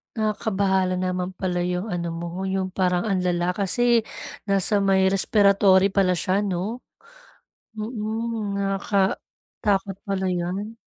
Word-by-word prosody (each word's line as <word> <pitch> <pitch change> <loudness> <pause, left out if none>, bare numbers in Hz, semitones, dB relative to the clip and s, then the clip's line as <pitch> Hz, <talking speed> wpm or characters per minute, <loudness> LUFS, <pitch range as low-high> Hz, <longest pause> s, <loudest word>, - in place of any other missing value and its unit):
Nakakabahala 200 -4 0
naman 185 0 -2
pala 180 -1 -2
'yong 180 +4 -2
ano 175 -1 -2
mo 175 +3 -4
'yong 190 -1 -1
parang 180 -2 +1
ang 195 -4 0
lala 180 -1 0
kasi 230 +5 +2 0.5
nasa 195 +1 +3
may 190 -1 +3
respiratory 195 -1 +4
pala 190 -2 +2
siya 185 +3 0
'no. 205 +3 -2 1.0
Hmm, 220 -1 -3
nakakatakot 195 0 -1
pala 195 -1 -1
'yan. 185 +5 -3
195 Hz, 115 wpm, -24 LUFS, 185-205 Hz, 1.0 s, respiratory